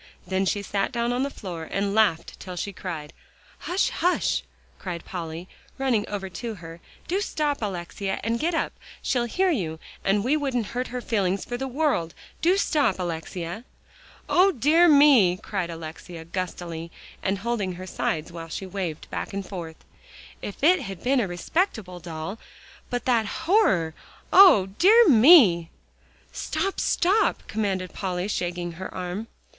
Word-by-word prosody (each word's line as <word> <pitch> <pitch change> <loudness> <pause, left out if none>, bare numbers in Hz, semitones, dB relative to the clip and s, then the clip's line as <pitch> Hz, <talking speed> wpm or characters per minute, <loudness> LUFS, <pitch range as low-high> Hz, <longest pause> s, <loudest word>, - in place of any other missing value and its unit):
Then 190 +1 0
she 205 +1 0
sat 200 0 -1
down 235 +1 0
on 250 - 0
the 280 - 0
floor 175 - -7
and 200 0 -1
laughed 200 -7 +1
till 185 -1 -7
she 200 +3 -4
cried. 165 -6 -6 0.5
"Hush 360 +3 0
hush!" 360 +1 +1 0.4
cried 175 -3 -6
Polly, 170 -1 -6 0.3
running 250 -6 0
over 200 -2 -4
to 220 +5 -6
her, 165 -2 -10 0.3
"do 380 +4 0
stop, 295 -8 -1
Alexia, 195 0 -3
and 230 +2 0
get 330 +2 0
up. - - -1 0.3
She'll 245 -2 +1
hear 370 +10 +1
you, 170 - -2 0.3
and 200 +1 +2
we 265 +6 +2
wouldn't 265 -6 -1
hurt 250 +1 -2
her 250 0 -5
feelings 200 -5 0
for 245 - -4
the 265 +2 -3
world. 265 - 0 0.3
Do 360 +4 +4
stop, 290 - +2
Alexia." 175 +3 -4 0.6
"O 380 +2 +5
dear 315 +5 +4
me!" 280 - +6
cried 190 -3 -3
Alexia 165 +1 -8
gustily, 170 -2 -5 0.3
and 195 +1 0
holding 205 -3 -2
her 185 +1 -8
sides 165 -3 -2
while 165 -1 -8
she 190 - -5
waved 180 -5 -4
back - - -4
and 195 -1 -4
forth; 170 -4 -8 0.6
"if 205 - -7
it 355 +2 +5
had 195 -7 -7
been 265 +1 +3
a 220 - 0
respectable 185 - -2
doll, 170 +5 -6 0.5
but 245 -1 -3
that 230 -4 +2 0.2
horror! 205 - +3 0.4
O 360 - +8
dear 445 +5 +7
me!" 225 - +7 0.6
"Stop 390 - -2
stop!" 390 +5 +2
commanded 195 -4 -2
Polly, 185 -1 -2
shaking 175 -3 -2
her 175 +3 -7
arm. 185 +4 -5
200 Hz, 155 wpm, -25 LUFS, 175-260 Hz, 0.6 s, O